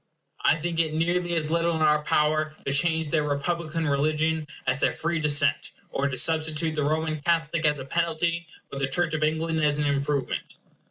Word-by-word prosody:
I - - +5
think 165 +1 -3
it 160 -2 +1
is - - 0
nearly 175 +1 0
as 155 -1 -1
little 170 0 +1
in 160 - 0
our 150 0 +4
power 155 +1 +1
to 135 - 0
change 160 +1 +2
their 155 0 +2
republican 160 +2 -2
religion 155 +2 0 0.2
as 130 +2 +1
their - - +1
free 170 0 -1
descent; 145 -2 +1 0.2
or 140 - 0
to 130 -2 -3
substitute 160 +2 +2
the 150 -1 -1
Roman 155 +1 -1
Catholic 165 0 0
as 150 -1 +3
a 130 - -7
penalty, 170 +2 -1 0.3
or 140 - -4
the 135 - 0
Church 165 +4 +1
of 155 - -1
England 160 +1 0
as 150 -1 +2
an 150 - 0
improvement. 140 -1 -1
155 Hz, 200 wpm, -26 LUFS, 150-165 Hz, 0.3 s, I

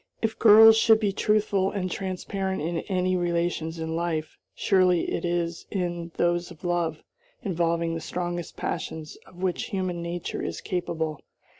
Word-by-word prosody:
If 220 0 -2
girls 220 0 +9
should 220 -1 +5
be 205 -3 0
truthful 205 -2 +2
and 185 -3 -3
transparent 190 +1 -3
in 165 +1 -1
any 185 -1 +1
relations 170 -2 -1
in 160 0 -3
life, 165 -2 -2 0.2
surely 185 -3 +3
it - - -2
is 170 -1 -2
in 175 -3 -3
those 175 0 +1
of 170 -3 -14
love, 170 -3 -1 0.4
involving 170 -2 0
the 165 - -4
strongest 175 -1 -4
passions 160 -2 -4
of 180 +1 -11
which 185 -2 0
human 185 -3 -3
nature 170 0 -4
is - - -4
capable. 160 -4 -3
175 Hz, 150 wpm, -26 LUFS, 170-190 Hz, 0.4 s, girls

